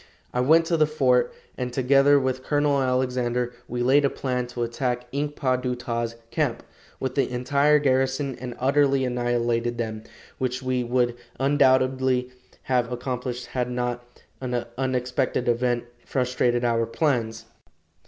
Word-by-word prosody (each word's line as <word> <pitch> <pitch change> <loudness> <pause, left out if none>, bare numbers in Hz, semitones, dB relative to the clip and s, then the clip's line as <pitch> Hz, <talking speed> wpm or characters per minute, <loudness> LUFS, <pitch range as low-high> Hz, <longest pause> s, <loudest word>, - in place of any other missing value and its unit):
I 125 - 0
went 160 +6 +5
to 165 0 +1
the 155 -1 +4
fort, 125 -5 +2 0.3
and 125 -1 -2
together 135 +3 +4
with 130 -1 -1
Colonel 145 -1 +2
Alexander, 125 -1 0
we 120 0 -2
laid 135 +4 +4
a 140 - +3
plan 125 -2 -2
to 120 -1 -4
attack 125 +1 -2
Ink 145 +1 -2
pa 130 -2 +1
du 125 0 -2
ta's 115 -1 -3 0.2
camp, - - -1 0.4
with 130 -1 -2
the 135 -1 +1
entire 140 +4 +3
garrison, 135 0 +1
and 125 -2 -5
utterly 135 0 +2
annihilate 120 -1 0
them, 110 -2 -3 0.4
which 130 0 -2
we 130 -1 0
would 120 0 +1 0.2
undoubtedly 130 -2 +2 0.3
have 125 -2 0
accomplished 125 0 -4
had 125 -1 -2
not 125 0 -4 0.2
an 125 -2 -2
unexpected 125 -1 -1
event 120 0 +1 0.2
frustrated 125 -1 0
our 115 -1 +1
plans. 115 -5 -1
125 Hz, 145 wpm, -25 LUFS, 120-135 Hz, 0.4 s, went